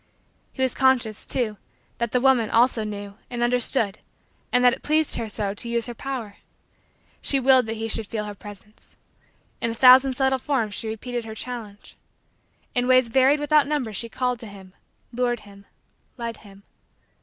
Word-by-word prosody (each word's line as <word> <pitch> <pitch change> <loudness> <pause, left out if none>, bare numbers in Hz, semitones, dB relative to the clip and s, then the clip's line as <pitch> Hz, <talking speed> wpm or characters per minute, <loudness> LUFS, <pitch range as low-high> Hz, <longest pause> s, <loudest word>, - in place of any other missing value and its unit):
He 260 - -3
was 260 - +1
conscious, 255 -5 +1
too, 220 -5 0 0.4
that 235 -2 -1
the 250 - +2
woman, 245 -4 +3
also, 235 -1 +3
knew 205 -1 -7
and 240 -1 -3
understood 240 -3 +1 0.5
and 250 0 +3
that 245 - +6
it - - -7
pleased 310 0 +1
her 230 -2 -4
so 205 -1 -2
to 235 +3 -2
use 235 -1 -1
her 240 - -6
power. 235 -5 -6 0.8
She 275 - +2
willed 260 -2 +4
that 225 0 -4
he 225 +1 -3
should 225 -1 0
feel 215 0 -3
her 210 - -6
presence. 205 +1 -14 0.6
In 230 - 0
a 230 - -4
thousand 260 +2 +6
subtle 265 0 +1
forms 245 -7 -1
she 220 - -4
repeated 235 +2 -5
her 220 -1 -8
challenge. 220 -4 -8 0.8
In 245 0 0
ways 255 -2 +4
varied 265 +4 +4
without 295 -1 +3
number 280 -7 -2
she 230 +3 -4
called 250 0 -2
to 230 - -10
him, 190 -2 -13 0.4
lured 240 -1 -1
him, 200 -1 -16 0.5
led 235 -1 -5
him. 200 -1 -17
235 Hz, 180 wpm, -24 LUFS, 215-255 Hz, 0.8 s, that